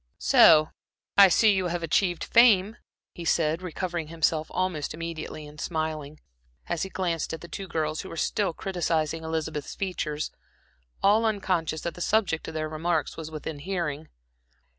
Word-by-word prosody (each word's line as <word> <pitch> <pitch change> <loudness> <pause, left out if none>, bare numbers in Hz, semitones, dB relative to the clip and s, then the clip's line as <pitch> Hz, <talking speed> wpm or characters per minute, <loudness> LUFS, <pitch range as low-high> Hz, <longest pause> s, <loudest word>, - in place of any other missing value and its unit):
"So 155 -1 +6 0.4
I 200 -1 +9
see 210 +4 +5
you 190 -2 0
have 175 0 -3
achieved 175 +2 +1
fame," 220 -3 +5 0.4
he 175 - -8
said, 160 0 +1
recovering 175 -2 -4
himself 160 -1 0
almost 175 -5 -2
immediately 160 -2 -6
and 150 +1 -10
smiling, 155 -2 -3 0.5
as 175 -2 -2
he 190 - -2
glanced 175 -4 -2
at 160 - -12
the 170 - -9
two 195 +2 -6
girls 155 -2 -2
who - - -9
were 165 - -8
still 200 +3 0
criticizing 165 -3 -1
Elizabeth's 160 -2 -3
features, 155 -6 -3 0.7
all 210 +3 +5
unconscious 185 -8 0
that 170 - -3
the 180 - -10
subject 195 -5 +1
of 160 - -7
their 155 0 -1
remarks 160 +1 -1
was 160 -1 -7
within 155 -1 -6
hearing. 160 -3 -3
165 Hz, 160 wpm, -26 LUFS, 155-185 Hz, 0.7 s, I